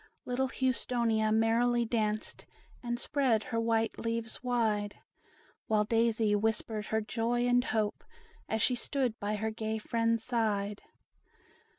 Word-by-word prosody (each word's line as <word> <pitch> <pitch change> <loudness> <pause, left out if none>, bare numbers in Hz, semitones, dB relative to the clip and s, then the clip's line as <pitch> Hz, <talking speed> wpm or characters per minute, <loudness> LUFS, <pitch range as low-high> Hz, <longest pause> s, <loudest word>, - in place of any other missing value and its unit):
Little 255 +2 0
Houstonia 235 -4 +1
merrily 235 +2 +3
danced, 215 -2 -2 0.3
And 240 -1 -3
spread 250 -6 +1
her 230 - -2
white 225 0 0
leaves 230 +1 -3
wide; 220 -4 0 0.7
While 215 -1 +3
Daisy 225 -1 +2
whispered 215 0 -1
her 220 0 0
joy 235 +3 0
and 245 +1 +3
hope, 215 -1 -1 0.5
As 220 -1 0
she 255 - +3
stood 245 -1 -1
by 205 +1 -1
her 220 +1 -2
gay 220 0 -3
friends' 230 +1 0
side. 210 -4 -1
225 Hz, 125 wpm, -31 LUFS, 215-240 Hz, 0.7 s, merrily